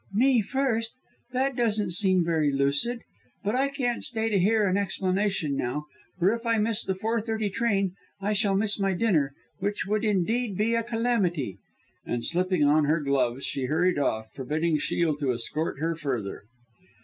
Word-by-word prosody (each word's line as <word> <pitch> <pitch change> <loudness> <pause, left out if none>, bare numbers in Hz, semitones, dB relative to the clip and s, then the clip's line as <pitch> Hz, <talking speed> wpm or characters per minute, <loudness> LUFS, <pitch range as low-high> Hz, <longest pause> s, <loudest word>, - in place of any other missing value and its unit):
"Me 250 +1 +4
first! 230 -1 -1 0.4
That 260 +1 0
doesn't 215 -6 +1
seem 185 -1 +3
very 160 -3 +2
lucid 140 - +1 0.4
but 205 +1 0
I 270 +2 +2
can't 250 -4 -2
stay 225 -2 -1
to 205 -3 +2
hear 210 +3 +3
an 185 - +1
explanation 190 -5 0
now, 135 +4 -2 0.3
for 185 +4 +3
if 230 0 -4
I 230 -1 +2
miss 220 +1 +1
the 190 - -1
four 225 +4 -1
thirty 220 -2 -2
train 195 -4 +1 0.3
I 205 +2 0
shall 200 -1 +2
miss 205 +1 +1
my 195 -1 +1
dinner, 165 -9 +1 0.2
which 205 +2 -1
would 215 +2 0
indeed 215 +1 0
be 220 +2 +1
a 230 - +2
calamity!" 215 - 0 0.4
And 120 -1 -2
slipping 180 -2 +1
on 150 +1 +4
her 155 +3 +2
gloves, 135 -3 0
she 135 - -2
hurried 160 +4 +2
off, 110 -5 -1
forbidding 155 +4 0
Shiel 160 0 0
to 140 -4 0
escort 140 +6 -2
her 165 +2 0
further. 130 -10 -3
195 Hz, 175 wpm, -27 LUFS, 155-225 Hz, 0.4 s, Me